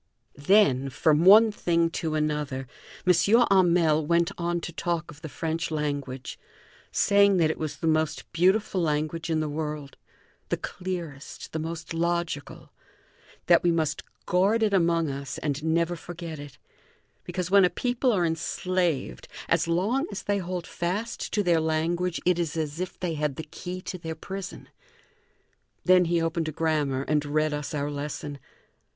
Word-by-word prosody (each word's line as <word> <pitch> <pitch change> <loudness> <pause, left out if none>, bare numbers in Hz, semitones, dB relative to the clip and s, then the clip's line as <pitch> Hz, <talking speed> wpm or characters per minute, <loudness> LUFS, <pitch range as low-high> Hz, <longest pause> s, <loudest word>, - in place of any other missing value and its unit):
Then, 140 -10 +4
from 155 +4 +2
one 215 +3 +8
thing 170 -4 +1
to 160 -2 -2
another, 150 -3 -1 0.4
M. 180 - +6 0.4
Hamel 170 -5 +4
went 170 +2 +2
on 175 0 -1
to 170 - -6
talk 170 -1 -2
of 150 +1 -15
the 160 - -7
French 165 +2 -3
language, 145 -4 -4 0.5
saying 200 -1 +4
that 160 -2 +3
it - - -7
was 155 -2 -3
the 165 - -5
most 155 -1 +1
beautiful 190 +3 +2
language 155 +1 -1
in 160 -1 +1
the 155 - -1
world 150 -1 -5 0.5
the - - 0
clearest, 170 -6 -6
the 160 - -2
most 165 +1 -5
logical; 170 -3 -2 0.7
that 170 -1 +5
we 175 - +2
must 155 -3 0 0.2
guard 200 +6 +2
it 210 -2 +2
among 170 -3 +3
us 140 -1 -5
and 150 0 -3
never 165 +2 +1
forget 170 -2 -8
it, 145 -1 -10 0.7
because 180 0 -4
when 200 -1 +7
a 180 - +5
people 245 +3 0
are 185 -6 +2
enslaved, 165 - -1 0.2
as - - +2
long 210 - +1
as 200 - -5
they 205 0 0
hold 180 -1 -4
fast 200 +7 -3
to 210 - +1
their 170 -3 +3
language 165 +3 0
it 180 -1 +3
is 165 -2 -2
as 155 0 -3
if 185 0 -5
they 180 -3 -2
had 150 -3 -1
the 160 - -5
key 180 +4 -7
to 185 - -6
their 160 -1 -5
prison. 190 +4 -7 1.2
Then 180 0 +6
he 170 0 +1
opened 165 0 -1
a - - -2
grammar 150 -4 0
and 150 0 +1
read 155 +1 0
us 150 +1 -4
our 145 0 -2
lesson. 145 0 -5
165 Hz, 165 wpm, -26 LUFS, 150-180 Hz, 1.2 s, one